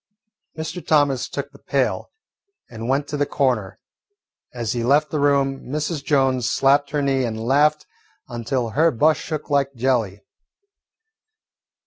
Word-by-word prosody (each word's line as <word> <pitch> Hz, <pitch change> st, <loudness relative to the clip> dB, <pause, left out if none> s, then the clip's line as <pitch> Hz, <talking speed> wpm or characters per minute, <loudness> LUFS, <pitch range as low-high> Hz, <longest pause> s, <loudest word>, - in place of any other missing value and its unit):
Mr. 160 Hz, +3 st, -5 dB
Thomas 145 Hz, -4 st, +2 dB
took -, -, -5 dB
the -, -, -17 dB
pail -, -, -1 dB, 0.6 s
and 115 Hz, +1 st, -6 dB
went 140 Hz, +2 st, +1 dB
to 150 Hz, -, -3 dB
the 145 Hz, -, +1 dB
corner. 120 Hz, -9 st, -1 dB, 0.7 s
As 120 Hz, -3 st, -3 dB
he 120 Hz, -1 st, -2 dB
left 145 Hz, +5 st, +2 dB
the 155 Hz, -, -1 dB
room, 140 Hz, -1 st, +1 dB
Mrs. 150 Hz, +1 st, -3 dB
Jones 130 Hz, -5 st, +1 dB
slapped 140 Hz, +3 st, +3 dB
her 145 Hz, -1 st, -1 dB
knee 135 Hz, -1 st, +1 dB
and 110 Hz, -2 st, -3 dB
laughed 145 Hz, +6 st, +2 dB, 0.4 s
until 120 Hz, 0 st, -3 dB
her 160 Hz, +7 st, +3 dB
bust 150 Hz, +3 st, +2 dB
shook 155 Hz, -2 st, -5 dB
like 140 Hz, -1 st, +1 dB
jelly. 115 Hz, -5 st, 0 dB
135 Hz, 140 wpm, -22 LUFS, 120-145 Hz, 0.7 s, slapped